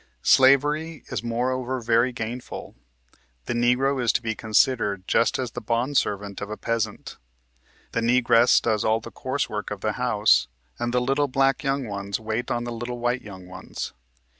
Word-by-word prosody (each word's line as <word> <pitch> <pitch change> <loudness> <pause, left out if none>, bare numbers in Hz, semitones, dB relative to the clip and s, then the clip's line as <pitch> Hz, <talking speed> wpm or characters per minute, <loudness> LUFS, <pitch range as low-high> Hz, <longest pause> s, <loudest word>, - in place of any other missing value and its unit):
" - - -42
Slavery 145 +4 +3
is - - -2
moreover 125 +2 -1
very 115 +2 +2
gainful. 120 +1 -6 0.7
The - - -2
Negro 125 +3 +2
is 120 - +3
to - - 0
be 110 -1 -1
considered 105 -3 +1
just 115 - +2
as 125 -2 -3
the - - -6
bond 120 +5 -1
servant 100 -4 -1
of 100 - -5
a 105 - -5
peasant, 110 -3 -3 0.7
The 115 - -1
Negress 120 0 +4
does 110 -3 0
all 110 +1 +2
the - - -10
coarse - - -2
work - - -4
of - - -6
the - - 0
house, 65 +1 +3 0.3
and 120 0 -1
the 125 0 +1
little 135 +3 +1
black 135 +1 +1
young 135 -1 0
ones 100 +2 -4
wait 110 +2 -3
on 120 0 -1
the 120 - -5
little 120 +1 -5
white 120 +1 -1
young 95 -4 -11
ones. 90 - -7
120 Hz, 180 wpm, -24 LUFS, 110-130 Hz, 0.7 s, Negress